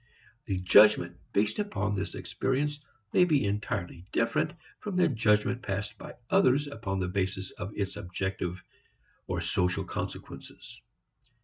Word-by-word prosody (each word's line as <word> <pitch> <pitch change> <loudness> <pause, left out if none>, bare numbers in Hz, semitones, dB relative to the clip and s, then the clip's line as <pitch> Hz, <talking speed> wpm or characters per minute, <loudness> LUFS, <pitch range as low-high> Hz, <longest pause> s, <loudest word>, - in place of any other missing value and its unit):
The 95 -3 0
judgment 90 -1 +6 0.2
based 105 - +1
upon 205 - -1
this 100 -1 -3
experience 145 +3 -1 0.3
may 180 - +6
be 150 -10 +3
entirely 100 -3 -3
different 115 +7 +1 0.3
from 205 -3 -5
the 180 -1 +5
judgment 115 -2 +2
passed 100 -1 -3
by - - -9 0.2
others 145 -7 +4
upon 110 -9 -3
the 90 - 0
basis 95 0 -2
of 95 - -6
its 100 -1 -2
objective 95 -2 -3 0.6
or - - -1
social 90 0 0
consequences. - - -7
105 Hz, 130 wpm, -29 LUFS, 95-130 Hz, 0.6 s, judgment